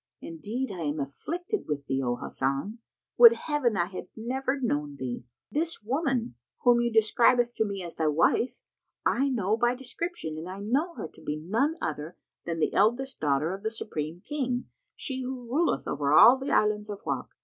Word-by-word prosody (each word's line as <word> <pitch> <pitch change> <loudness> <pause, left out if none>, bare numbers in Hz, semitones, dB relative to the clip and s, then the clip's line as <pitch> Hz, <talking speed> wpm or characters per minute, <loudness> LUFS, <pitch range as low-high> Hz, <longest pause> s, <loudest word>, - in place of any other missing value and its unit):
Indeed 210 +11 -4
I 185 - -6
am 150 -1 -2
afflicted 345 - -4
with 145 -2 -3
thee, 135 0 -1
O 120 -2 0
Hasan! 140 - -3 0.4
Would 470 -1 +11
Heaven 295 - 0
I 175 - +2
had 185 +1 -8
never 265 +4 -2
known 150 - -1
thee! 125 -3 -5 0.3
This 325 -4 -1
woman, 260 - 0 0.3
whom 245 -1 +5
thou 240 0 +2
describest 235 +2 +4
to 220 - +2
me 200 -2 -4
as 170 - -8
thy 160 - +1
wife, 165 - +2 0.4
I 275 +3 +2
know 215 -5 +1
by 240 +1 +2
description 255 - -4
and 170 +3 -7
I 190 +1 -7
know 275 - 0
her - - -5
to - - -18
be 150 - -3
none 225 - 0
other 155 +2 -4 0.3
than 170 -1 -2
the 160 - 0
eldest 240 +6 +2
daughter 150 +3 +1
of 195 - -7
the 220 - -1
Supreme 160 -6 -5
King, 255 -3 -2 0.3
she 260 -2 -4
who 255 -1 -5
ruleth 310 +8 +1
over 140 -1 0
all 235 - +9
the 270 +1 -5
Islands 210 0 +2
of 205 -1 -6
Wak. - - -2
220 Hz, 185 wpm, -28 LUFS, 160-260 Hz, 0.4 s, Would